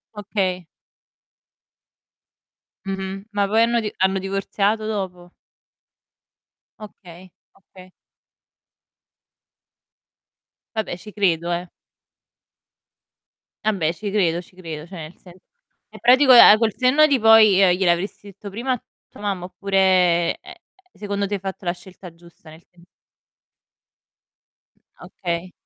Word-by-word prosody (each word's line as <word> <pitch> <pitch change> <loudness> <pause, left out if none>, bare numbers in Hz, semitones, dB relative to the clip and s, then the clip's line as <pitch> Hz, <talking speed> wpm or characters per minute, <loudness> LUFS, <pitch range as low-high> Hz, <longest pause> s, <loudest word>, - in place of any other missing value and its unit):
Okay. 190 -4 -3 2.2
Mh-mh. 195 +1 -6
Ma 205 -1 0
poi 220 +3 +2
hanno 235 +1 +2
di 215 -2 -4
hanno 190 +1 +1
divorziato 200 +2 -2
dopo? 185 -4 -5 1.5
Okay, 185 -4 -14 0.3
okay. 185 -1 -17 2.8
Vabbè 215 -5 -3
ci 210 +3 -13
credo, 175 -4 0
eh. 175 +1 -3 2.0
Vabbè 185 -7 0
ci 200 +3 -6
credo, 175 -4 0
ci 180 - -22
credo. 160 -4 -8
Cioè, 185 - -12
nel 155 +1 -9
sen 180 -2 -16 0.6
è - - -14
pratico 260 +3 +5
a 215 -3 +9
col 220 -1 0
senno 265 +4 +4
di 275 -4 +1
poi, 220 -2 +6
gli 185 -2 +4
glielo 185 -3 +3
avresti 195 +3 -4
detto 200 +1 -11
prima 235 +7 -4
a 250 - -6 0.3
tua - - -15
mamma, 195 -4 -3
oppure, 185 -3 +1
ehm, - - -12 0.4
secondo 200 -1 -4
te 205 - -3
hai - - -5
fatto 190 0 -7
la 175 - +1
scelta 180 -1 -14
giusta 170 -1 -19
nel 160 +2 -16
tem 175 -1 -23 2.2
Okay, 175 0 -5
195 Hz, 115 wpm, -21 LUFS, 175-210 Hz, 2.8 s, a